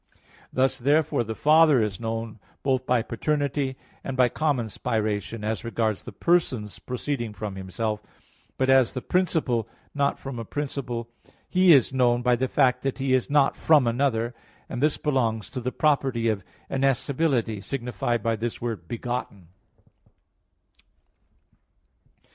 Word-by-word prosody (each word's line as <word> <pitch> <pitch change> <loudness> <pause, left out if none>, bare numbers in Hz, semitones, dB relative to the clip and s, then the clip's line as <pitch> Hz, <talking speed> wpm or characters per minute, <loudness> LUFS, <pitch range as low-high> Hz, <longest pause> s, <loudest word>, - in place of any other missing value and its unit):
Thus 130 0 +1
therefore 145 +1 +2
the 110 0 -5
Father 155 -1 +5
is 105 -1 -1
known 115 -1 -4 0.2
both 130 -2 0
by 125 -2 +2
paternity 140 +1 -1 0.3
and 135 0 -4
by 125 -1 +5
common 145 -4 0
spiration, 110 +1 -2
as 110 +1 -2
regards 115 -3 -1
the - - -9
persons 130 - 0
proceeding 125 -3 -3
from 105 -1 -5
Himself. 105 +3 -3 0.6
But 130 - +1
as 130 -3 +4
the 125 - -4
principle, 150 - 0 0.2
not 140 -1 +1
from 135 -3 -6
a - - -4
principle 125 -3 -4 0.4
He 185 -1 +5
is 135 -3 +5
known 120 -2 +2
by 125 0 +4
the 130 +2 0
fact 125 -2 +2
that 135 0 -2
He 135 -1 0
is 130 -2 +1
not 145 -1 +3
from 150 -5 +4
another; 120 -1 0 0.3
and 120 - -5
this 150 0 +2
belongs 115 -7 -1
to 130 - -4
the 125 +1 -2
property 135 -7 +1
of 105 -4 -1 0.2
innascibility, 135 -4 0
signified 120 -3 -2
by 115 -1 +1
this 115 +1 -3
word 110 -8 -4
"begotten." 115 -6 -5
125 Hz, 140 wpm, -25 LUFS, 115-140 Hz, 0.6 s, Father